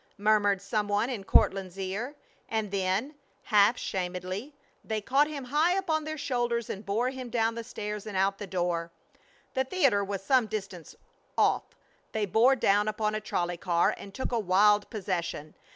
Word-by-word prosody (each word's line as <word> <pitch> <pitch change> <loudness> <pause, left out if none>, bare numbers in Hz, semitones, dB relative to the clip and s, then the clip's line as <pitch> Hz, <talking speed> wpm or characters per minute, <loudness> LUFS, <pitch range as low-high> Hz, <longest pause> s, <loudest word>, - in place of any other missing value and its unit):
murmured 205 -1 +3
some 205 +2 -1
one 205 +5 +1
in 215 -6 -4
Courtland's 190 -1 +2
ear. 200 +9 -4 0.3
And 220 -3 -1
then, 195 +8 0 0.3
half 210 +2 +4
shamedly, 185 +7 -4 0.3
they 220 -1 -2
caught 270 +7 +3
him 295 -3 -5
high 300 +7 +2
upon 320 -5 0
their 310 0 -4
shoulders 240 -5 -1
and 200 - -6
bore 225 +6 0
him 260 -2 -7
down 230 -1 +1
the 230 0 -5
stairs 210 -3 -5
and 205 -3 -4
out 195 +1 +1
the 205 - -5
door. 175 -2 -1 0.6
The 265 - +1
theater 265 - +2
was 195 -1 -4
some 255 0 +3
distance 195 -6 -6 0.4
off. - - +3 0.5
They 215 -1 0
bore 230 +7 +4
down 205 -3 +3
upon 215 0 0
a 215 - -2
trolley 175 -4 -2
car 170 -1 +2
and 200 - -10
took 260 +6 -4
a 235 - +1
wild 205 +1 +4
possession. 175 -7 -3
210 Hz, 170 wpm, -29 LUFS, 195-245 Hz, 0.6 s, half